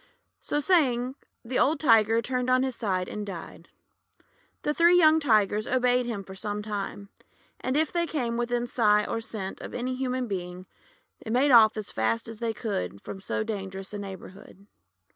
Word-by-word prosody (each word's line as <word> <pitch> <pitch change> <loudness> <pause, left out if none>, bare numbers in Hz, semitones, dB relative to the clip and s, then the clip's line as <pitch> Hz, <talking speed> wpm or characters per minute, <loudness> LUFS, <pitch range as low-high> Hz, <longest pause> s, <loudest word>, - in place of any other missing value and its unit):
So 295 - -1
saying, 260 -7 +2 0.3
the 250 +2 -1
old 305 +4 +3
Tiger 225 -4 +4
turned 250 +1 -1
on 255 0 +4
his 260 -2 -2
side 190 -6 -1
and 210 - -5
died. 195 -5 -9 0.9
The 295 - 0
three 340 +3 +5
young 315 -2 +6
Tigers 215 -6 +2
obeyed 250 -1 +2
him 215 -4 -4
for 190 - -11
some 205 +2 -4
time; 200 -1 -5 0.5
and 260 +2 -1
if 315 0 +1
they 340 -1 0
came 245 -7 -2
within 240 0 -1
sight 210 -3 +2
or 230 - -2
scent 200 -4 -5
of - - -7
any 250 +1 -2
human 255 -1 -2
being, 180 -2 -5 0.6
made 250 +6 +2
off 220 -3 +7
as 215 - -4
fast 110 +1 -1
as 225 -1 -8
they 230 -1 -1
could 200 - -4
from 195 - -8
so 210 - -2
dangerous 195 -2 -6
a 205 - -4
neighbourhood. 195 0 -10
225 Hz, 175 wpm, -27 LUFS, 200-255 Hz, 0.9 s, off